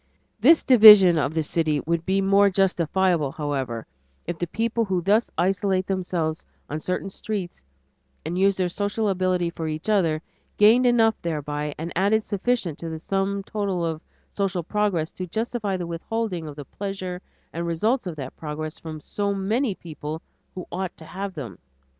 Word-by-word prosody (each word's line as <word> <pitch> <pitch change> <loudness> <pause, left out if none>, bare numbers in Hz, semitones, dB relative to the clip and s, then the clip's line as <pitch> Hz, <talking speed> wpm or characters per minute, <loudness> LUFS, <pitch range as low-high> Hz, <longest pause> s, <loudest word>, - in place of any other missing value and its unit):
This 300 +9 +6
division 210 -8 +9
of 150 +1 -1
the 160 - +1
city 155 -1 0
would 170 +1 -1
be 195 +1 +2
more 200 +1 +5
justifiable, 180 -4 +1
however, 135 -7 -3 0.4
if 170 -2 -4
the 175 - -1
people 230 +5 0
who 185 -4 -1
thus 210 +5 +3
isolate 190 +1 +1
themselves 175 -4 -2 0.3
on 155 - -2
certain 185 +4 -3
streets 195 - -5 0.6
and 165 +3 -3
use 195 +1 +3
their 185 -1 +1
social 205 +4 -1
ability 185 -2 0
for 160 -1 -5
each 155 +6 -4
other, 165 -6 +2 0.3
gained 230 +5 +6
enough 225 -2 +3
thereby 150 -2 -3
and 165 +2 -5
added 205 +4 +2
sufficient 200 -6 -1
to 165 - -5
the 160 - -5
sum 195 +3 -1
total 195 -4 -2
of 160 -1 -3 0.3
social 190 -3 -1
progress 185 -4 0
to 185 - -6
justify 220 0 -2
the 175 - -4
withholding 175 +1 -3
of 145 - -8
the 145 -1 -8
pleasures 185 0 -5 0.3
and 170 +1 -3
results 215 +8 0
of 170 - -4
that 135 -3 -7
progress 155 0 -6
from 160 -1 -7
so 200 +6 -2
many 210 +3 0
people 155 -2 -7 0.3
who 180 - -6
ought 185 0 -4
to 160 - -12
have 195 +3 -6
them. 120 - -7
185 Hz, 170 wpm, -24 LUFS, 160-200 Hz, 0.6 s, division